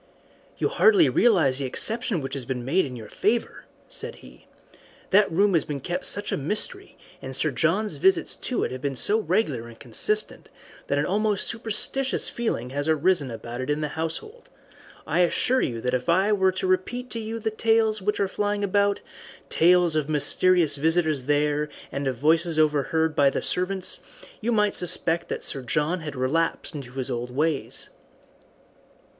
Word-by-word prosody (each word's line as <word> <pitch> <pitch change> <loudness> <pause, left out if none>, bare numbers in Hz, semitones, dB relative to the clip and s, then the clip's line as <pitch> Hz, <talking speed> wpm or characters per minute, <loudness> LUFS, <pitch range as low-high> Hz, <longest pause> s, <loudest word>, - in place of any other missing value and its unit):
"You - - +1
hardly 425 -6 +4
realize 165 - +3
the 140 - -2
exception 205 - 0
which 135 0 -6
has 140 -2 -3
been 125 -1 -4
made 170 +5 +2
in 125 - -8
your 110 -3 -9
favour," 220 - -1 0.2
said - - -4
he. - - -17 0.6
"That 205 +1 +4
room 195 +4 +3
has 165 - +3
been 145 -2 -5
kept 175 +6 -2
such 205 - -1
a - - 0
mystery, 210 - -1 0.2
and 130 0 -5
Sir 150 +3 +1
John's 165 - 0
visits 380 -2 +2
to 255 - -2
it - - -2
have 130 0 -6
been 140 -1 -2
so 210 - +3
regular 160 - -1
and 115 -1 -14
consistent, 425 0 0 0.4
that 140 - 0
an 145 - +1
almost 210 +1 +1
superstitious 230 +4 0
feeling 130 - -3
has 145 +3 -2
arisen 160 -2 +2
about 120 +1 -6
it 130 - -5
in 150 +1 0
the 150 - -2
household. 165 - -6 0.6
I - - 0
assure 245 +8 +2
you 115 -2 -2
that 125 +1 -2
if 125 +3 -1
I 195 +5 +3
were 190 -2 +3
to 185 - -3
repeat 185 +7 -1
to 230 - -4
you 225 +1 -5
the 220 0 -2
tales 220 -1 +2
which 210 +2 -1
are 200 - +2
flying 205 +1 -2
about, 200 +1 +1 0.5
tales 175 -1 +4
of 155 -1 -1
mysterious 155 +1 +3
visitors 155 -3 +1
there, 150 +1 +1 0.2
and 140 0 -3
of 130 - -1
voices 160 +5 +2
overheard 155 +1 +1
by 140 -1 +5
the - - -3
servants, 185 +1 -2 0.4
you 230 +2 0
might 210 -3 +2
suspect 170 -1 +1
that - - -4
Sir 135 - -3
John 150 +7 -1
had 150 -3 -7
relapsed 160 +8 -1
into 135 -5 -8
his 130 0 -4
old 120 0 -3
ways." 150 +3 -2
165 Hz, 180 wpm, -25 LUFS, 140-205 Hz, 0.6 s, by